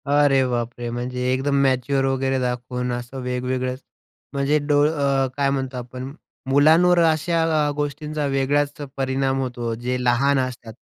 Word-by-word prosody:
अरे 145 -2 +4
बापरे! 120 0 -3
म्हणजे 125 +1 -3
एकदम 135 +2 0
मॅच्युअर 135 0 +1
वगैरे 135 0 0
दाखवून 125 0 -2
असं 120 +2 -5
वेगवेगळे 125 0 -2 0.6
म्हणजे 140 +2 +2
डोळ 145 0 +4
अ, 140 -3 +1
काय 140 -1 +2
म्हणतो 135 -2 -2
आपण, 125 +2 -7 0.4
मुलांवर 160 +6 +5
अशा 165 +2 0 0.3
आ - - +1
गोष्टींचा 150 +1 -3
वेगळाच 140 +1 +1 0.3
परिणाम 135 0 0
होतो, 120 -3 -3
जे 125 +2 -3
लहान 135 +3 +3
असतात. 125 -3 -4
135 Hz, 140 wpm, -22 LUFS, 125-140 Hz, 0.6 s, मुलांवर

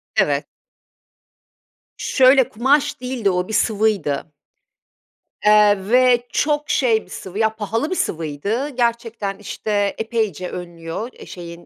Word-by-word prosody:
Evet. - - +2 1.5
Şöyle, 260 -1 +4
kumaş 275 +5 +1
değildi 250 -5 -1
o, 180 -1 -1
bir 220 - -6
sıvıydı. 205 -10 0 1.1
Eee, 210 -1 +6
ve 245 0 +4
çok 295 0 0
şey 230 -5 +2
bir - - -22
sıvı, 190 +2 -7
ya, 220 0 +1
pahalı 225 +7 -2
bir 370 - -1
sıvıydı. 170 - -2
Gerçekten, 230 -5 -2
işte, 205 0 -2
epeyce 220 -6 -2
önlüyor. 170 +4 -6
Eee, - - -13
şeyin, 170 -1 -10
220 Hz, 120 wpm, -20 LUFS, 190-245 Hz, 1.5 s, Eee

